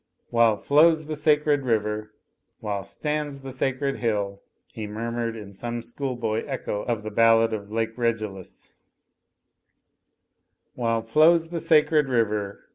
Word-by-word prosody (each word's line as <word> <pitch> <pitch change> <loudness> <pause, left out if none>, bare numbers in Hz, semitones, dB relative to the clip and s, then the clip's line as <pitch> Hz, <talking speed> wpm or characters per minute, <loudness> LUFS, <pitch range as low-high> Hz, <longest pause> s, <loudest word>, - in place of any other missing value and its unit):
"While 115 -2 +4
flows 155 +5 +4
the 155 0 -4
sacred 150 -1 +2
river, 105 -3 -1 0.5
While 100 -2 -3
stands 145 +5 -3
the 135 - -6
sacred 135 +1 -1
hill," 100 -4 -2 0.3
he 110 -1 -5
murmured 115 +2 -3
in 105 -3 -9
some 120 +4 -5
schoolboy 120 -4 -3
echo 105 - -3
of 115 -3 -2
the 110 - -5
ballad 115 +1 +4
of 105 -1 -5
Lake 115 0 -2
Regillus, 110 -6 -4 2.0
"While 115 -2 -1
flows 160 +7 +4
the 170 -1 -3
sacred 150 -3 +3
river. 105 -4 -1
115 Hz, 125 wpm, -25 LUFS, 110-140 Hz, 2.0 s, While